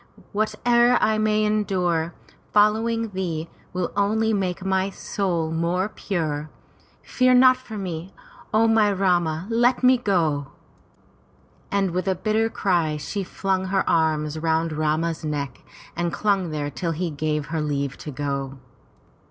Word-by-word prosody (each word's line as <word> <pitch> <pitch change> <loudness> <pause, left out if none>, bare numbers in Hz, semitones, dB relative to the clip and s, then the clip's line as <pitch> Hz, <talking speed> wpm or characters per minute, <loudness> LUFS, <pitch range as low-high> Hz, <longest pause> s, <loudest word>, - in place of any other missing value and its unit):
Whate'er 235 +3 +3
I 215 0 +2
may 215 0 +2
endure, 180 -6 0 0.4
following 225 +2 +2
thee, 170 -5 -3 0.2
will 180 -1 -2
only 220 +2 +2
make 190 -2 -2
my 190 0 +1
soul 175 -5 -2
more 170 +4 0
pure. 155 -8 -3 0.5
Fear 255 0 +3
not 255 0 +7
for 245 -4 -9
me! 180 -2 -5 0.4
O 220 +1 +4
my 220 -2 +4
Rama, 175 -4 +1
let 240 +3 +2
me 255 0 +5
go!" 160 - +1 1.2
And 195 -2 +1
with 185 +2 -2
a 190 - +2
bitter 220 +4 +1
cry 170 -8 0
she 195 +7 -4
flung 190 0 -1
her 190 0 0
arms 155 -2 +1
round 160 0 0
Rama's 155 +2 -1
neck 145 -3 -4 0.3
and 170 0 -1
clung 195 -4 0
there 145 -2 -3
till 165 +3 -2
he 170 +1 -2
gave 150 0 -2
her 160 - 0
leave 140 -2 -2
to - - -7
go. 140 -1 -3
185 Hz, 140 wpm, -23 LUFS, 160-210 Hz, 1.2 s, not